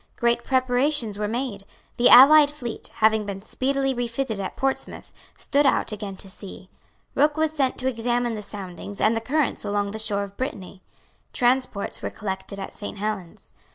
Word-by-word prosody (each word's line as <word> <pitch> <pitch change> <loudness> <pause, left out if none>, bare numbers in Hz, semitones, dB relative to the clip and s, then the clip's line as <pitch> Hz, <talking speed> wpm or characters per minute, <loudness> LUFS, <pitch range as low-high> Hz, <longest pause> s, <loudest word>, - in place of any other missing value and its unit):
Great 235 0 +1
preparations 255 -3 +1
were 210 - -1
made. 230 -3 -3 0.3
The 245 +1 +5
allied 290 +3 +9
fleet, 255 -6 -6
having 220 0 +3
been 195 -1 -6
speedily 270 +3 0
refitted 240 -2 -3
at 190 - -4
Portsmouth, 270 0 -3 0.2
stood 285 0 +2
out 260 - +2
again 205 -2 -6
to 195 - -7
sea. 190 -1 -9 0.4
Rooke 295 +2 +2
was 315 0 +2
sent 275 -5 0
to 260 - -2
examine 240 -1 0
the 215 - -5
soundings 200 -1 -8
and 220 +1 +3
the 225 - -1
currents 285 +4 0
along 205 -1 -1
the 220 - -5
shore 210 -2 0
of 200 0 -10
Brittany. 200 -8 -5 0.5
Transports 245 -4 0
were - - -3
collected 190 -1 -6
at 195 - -7
Saint 205 0 -7
Helens. 200 -4 -5
225 Hz, 170 wpm, -24 LUFS, 200-260 Hz, 0.5 s, allied